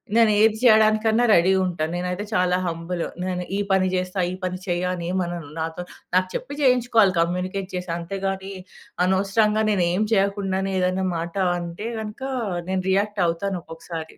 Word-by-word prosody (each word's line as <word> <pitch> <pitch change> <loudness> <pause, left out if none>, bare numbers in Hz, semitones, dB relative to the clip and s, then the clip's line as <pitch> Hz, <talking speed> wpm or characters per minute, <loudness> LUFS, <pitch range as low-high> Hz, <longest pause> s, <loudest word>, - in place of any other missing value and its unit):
నేనేది 220 -1 +5
చేయడానికన్నా 220 0 +5
రెడీ 175 +3 +5
ఉంటా, 175 -3 -2
నేనైతే 180 +3 -3
చాలా 180 -2 +2
హంబులు. 165 +1 -3 0.2
నేను 180 -1 -2
ఈ - - -1
పని 190 -1 +3
జేస్తా, 185 +1 -2
ఈ - - -4
పని 185 0 -2
చెయ్య 175 +1 0
అనేమనను. 175 -3 -3
నాతో 160 +2 -3 0.3
నాకు 185 0 +3
చెప్పి 280 +3 -5
జేయించుకోవాలి 245 -7 +4
కమ్యూనికేట్ 185 +3 -1
చేసి 180 0 -5
అంతేగానీ 195 +2 -4 0.5
అనవసరంగా 210 +3 +2
నేనేం 185 0 +1
చేయకుండానే 195 -1 0
ఏదైనా 185 +1 0
మాట 165 +1 -4 0.3
అంటే 175 +6 -6
గనక 215 +3 -7 0.5
నేను 190 -1 0
రియాక్ట్ 200 +1 +1
అవుతాను 180 +2 -2
ఒక్కొక్కసారి. 165 0 -8
185 Hz, 140 wpm, -23 LUFS, 180-205 Hz, 0.5 s, నేనేది